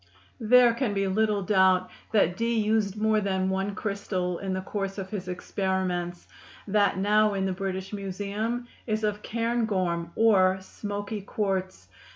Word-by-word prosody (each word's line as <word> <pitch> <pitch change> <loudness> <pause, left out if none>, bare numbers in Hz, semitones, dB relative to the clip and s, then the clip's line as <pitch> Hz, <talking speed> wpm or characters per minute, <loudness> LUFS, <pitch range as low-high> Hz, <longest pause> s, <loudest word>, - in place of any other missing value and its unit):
There 240 +1 +6
can 235 -4 -1
be 195 0 +1
little 210 +1 +1
doubt 185 -2 +3 0.2
that 195 -5 +3
Dee 230 +3 0
used 215 -2 +1
more 215 0 +2
than 190 -1 0
one 195 +1 -1
crystal 195 -4 -2
in 195 -1 -3
the 185 - -2
course 195 0 -4
of 190 -1 -6
his 190 -4 -4
experiments; 180 -1 -2 0.4
that 205 -1 +2
now 210 +1 +3
in 190 -1 0
the 190 - 0
British 190 +1 -4
Museum 205 +5 -3 0.2
is 215 -1 -1
of 210 0 -1
cairngorm, 210 -8 -1
or 190 -4 +4
"smoky 205 +2 -5
quartz." 190 - -3
200 Hz, 150 wpm, -27 LUFS, 190-215 Hz, 0.4 s, There